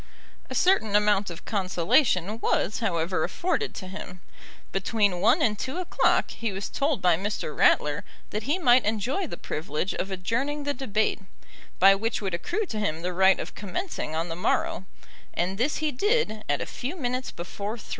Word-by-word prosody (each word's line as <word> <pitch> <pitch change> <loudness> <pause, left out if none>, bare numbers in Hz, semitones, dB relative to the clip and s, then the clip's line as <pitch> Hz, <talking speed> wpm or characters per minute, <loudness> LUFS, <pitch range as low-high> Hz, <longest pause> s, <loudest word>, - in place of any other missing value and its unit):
A - - -5
certain 290 - +3
amount 210 -1 +3
of 170 - -9
consolation 190 - +2
was, 215 - 0
however, 170 -5 0
afforded 370 +5 -1
to 185 - -6
him. 185 -1 -8 0.5
Between 195 -2 +1
one 230 +8 +4
and 210 -3 +1
two 265 +6 -3
o'clock 365 -2 +2
he 230 -2 -3
was 195 +1 -4
told 275 -7 -1
by 180 -2 +5
Mr. 195 -4 -3
Ratler 145 -1 +3 0.3
that 210 - -2
he 315 - +3
might 255 -7 +5
enjoy 230 - -1
the - - -7
privilege 155 +4 -3
of 190 - -3
adjourning 235 +11 -2
the 285 0 -1
debate, 220 -5 0 0.6
by 195 +2 +8
which 220 +3 -1
would 195 -3 -3
accrue 410 - -1
to 220 - -4
him 165 -5 -2
the 180 0 -2
right 190 +1 +5
of - - -5
commencing 205 - -4
on 165 +2 -1
the 165 - -4
morrow, 180 +1 0 0.5
and 185 +3 -1
this 275 +5 +1
he 310 -1 0
did 285 - +1
at - - +1
a - - -2
few 265 +8 -5
minutes 255 -5 -2
before 200 +6 -5
three. 215 - -13
210 Hz, 180 wpm, -26 LUFS, 185-260 Hz, 0.6 s, by